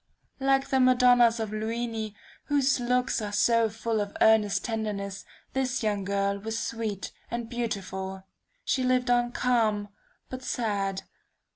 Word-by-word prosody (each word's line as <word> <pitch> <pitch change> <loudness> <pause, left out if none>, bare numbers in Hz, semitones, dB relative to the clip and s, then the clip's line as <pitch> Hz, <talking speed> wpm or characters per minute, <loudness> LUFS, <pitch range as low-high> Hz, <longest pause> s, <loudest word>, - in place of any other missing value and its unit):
Like 270 0 +2
the 265 - +3
Madonnas 245 -2 +5
of 220 -2 -3
Luini 220 0 -3 0.3
whose 280 -3 +2
looks 250 0 +1
are 205 -1 -4
so 230 +2 +3
full 225 0 -2
of 205 0 -5
earnest 210 -3 +4
tenderness, 210 -3 -3 0.3
this 265 -1 -1
young 205 -2 0
girl 200 0 0
was 225 +2 -4
sweet 220 -4 -3 0.2
and 235 -1 -3
beautiful. 190 -5 -4 0.4
She 260 - +1
lived 255 0 +2
on 240 0 +2
calm, 220 -5 +1 0.4
but 255 0 -7
sad. 200 -6 -2
225 Hz, 135 wpm, -27 LUFS, 205-245 Hz, 0.4 s, Madonnas